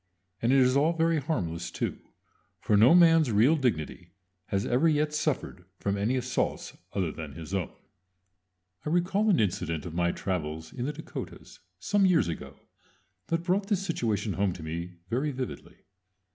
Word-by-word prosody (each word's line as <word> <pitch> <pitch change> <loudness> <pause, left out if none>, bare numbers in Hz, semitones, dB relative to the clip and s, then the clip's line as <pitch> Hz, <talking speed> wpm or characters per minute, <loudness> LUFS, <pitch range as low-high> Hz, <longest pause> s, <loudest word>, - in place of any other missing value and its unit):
And 115 - +2
it 135 - +5
is 130 0 +4
all 150 +4 +3
very 165 -1 +2
harmless 85 - -2
too; - - -3 0.6
for 105 - +1
no 115 +10 +7
man's 165 -6 +6
real 115 +9 +5
dignity 90 - -2 0.4
has 100 0 -1
ever 130 +7 +3
yet 150 0 +1
suffered 150 - -2
from 100 +1 -1
any 105 +6 0
assaults 125 0 -2 0.2
other 90 -5 0
than 75 -3 -8
his 80 +2 -8
own. 95 -4 -1 1.1
I - - -3
recall 190 +6 +2
an 190 - +4
incident 85 -6 -1
of 85 - -6
my 85 0 +1
travels 80 -4 -4
in 125 +1 -3
the - - -1
Dakotas 160 +2 -9 0.2
some 200 - +2
years 175 - +3
ago 80 - -7 0.7
that 165 0 -1
brought 195 +3 0
this 195 -2 0
situation 110 - -1
home 100 -2 0
to 85 - -9
me 85 +3 -5
very 130 +8 0
vividly. 130 -1 -7
120 Hz, 165 wpm, -28 LUFS, -, 1.1 s, no